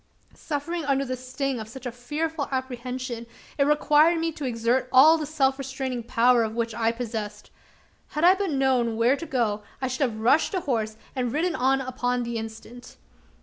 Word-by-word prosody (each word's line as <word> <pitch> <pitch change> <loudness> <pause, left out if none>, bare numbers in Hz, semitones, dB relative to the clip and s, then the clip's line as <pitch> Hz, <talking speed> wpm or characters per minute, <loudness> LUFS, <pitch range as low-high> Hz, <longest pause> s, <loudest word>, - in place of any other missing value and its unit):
Suffering 325 +3 -4
under 275 0 +1
the 255 0 -3
sting 255 +1 -3
of 220 - -6
such 255 +3 -11
a 245 - -2
fearful 295 +5 -3
apprehension, 250 -2 -4 0.3
it 280 - +5
required 300 +3 +4
me 330 0 0
to 295 -2 -6
exert 240 +1 0
all 295 +5 +8
the 310 -2 -3
self 275 -3 +1
restraining 265 -2 -4
power 240 +1 +3
of 220 -1 -2
which 230 -1 -1
I 225 +1 -1
was 230 - +1
possessed. 215 -3 -5 0.6
Had 300 - -4
I 360 +2 +8
but 390 0 -2
known 260 -5 +1
where 235 +4 +4
to 330 +3 -7
go, 220 -5 0 0.2
I 260 - -1
should 255 +3 -4
have 220 -1 -8
rushed 260 - +3
to 370 - 0
horse, 220 -7 -2 0.2
and 250 -3 -1
ridden 330 +6 0
on 270 0 +2
upon 250 -1 -1
the 235 0 -3
instant. 225 +2 -10
255 Hz, 190 wpm, -25 LUFS, 235-285 Hz, 0.6 s, all